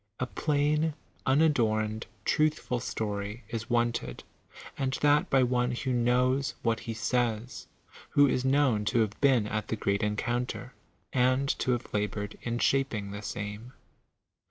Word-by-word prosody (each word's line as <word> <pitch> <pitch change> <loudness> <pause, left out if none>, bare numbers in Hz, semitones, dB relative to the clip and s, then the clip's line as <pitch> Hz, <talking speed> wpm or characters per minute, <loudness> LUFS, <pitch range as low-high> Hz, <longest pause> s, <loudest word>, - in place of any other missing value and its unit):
A 130 - 0
plain, 150 +3 +1 0.3
unadorned, 115 -7 +2 0.2
truthful 155 -5 +1
story 105 -1 -4
is 115 +1 -5
wanted, 120 - 0 0.5
and 135 -1 -1
that 145 0 +4
by 135 -1 +4
one 125 0 +1
who 130 +1 -2
knows 125 +3 +2
what 115 -1 +1
he 115 - -5
says, 120 +1 -1 0.4
who 145 - +5
is 130 -2 +1
known 130 -5 +3
to 115 +2 +2
have 105 -2 -2
been 130 -6 +4
at 110 0 -3
the - - -1
great 100 -1 0
en 105 0 0
counter, 120 +2 -3 0.4
and 130 +2 +2
to 125 - +1
have 120 - -5
labored 105 0 -2
in 120 0 -2
shaping 120 -7 0
the 100 +1 -6
same. 105 +4 -6
120 Hz, 145 wpm, -29 LUFS, 110-130 Hz, 0.5 s, who